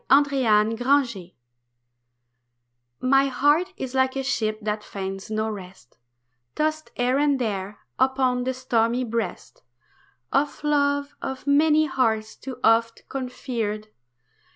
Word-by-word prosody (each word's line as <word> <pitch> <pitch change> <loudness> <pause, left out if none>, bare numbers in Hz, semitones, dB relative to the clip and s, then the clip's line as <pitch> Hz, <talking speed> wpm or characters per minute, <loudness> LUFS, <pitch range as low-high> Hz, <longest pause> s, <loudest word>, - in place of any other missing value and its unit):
NOT 280 +1 +5
ANCHORED 230 -3 +2 1.7
My 270 +2 +4
heart 295 +8 +2
is 260 -1 -5
like 260 0 +2
a 270 - -2
ship 215 -5 -1
that 210 0 -2
finds 195 -1 -6
no 215 0 -1
rest, 185 - -9 0.6
Tossed 310 0 -1
here 250 +2 +1
and 290 -1 +3
there 205 -4 -3 0.2
upon 260 -1 +2
the 260 +1 -2
stormy 240 -1 +1
breast 230 -5 -4 0.7
Of 290 +1 0
loves 285 -1 +1
of 265 0 -5
many 305 +2 +4
hearts 225 -6 0
too 260 -2 -8
oft 230 +1 +3
conferred. 235 -5 -4
255 Hz, 115 wpm, -24 LUFS, 220-275 Hz, 1.7 s, NOT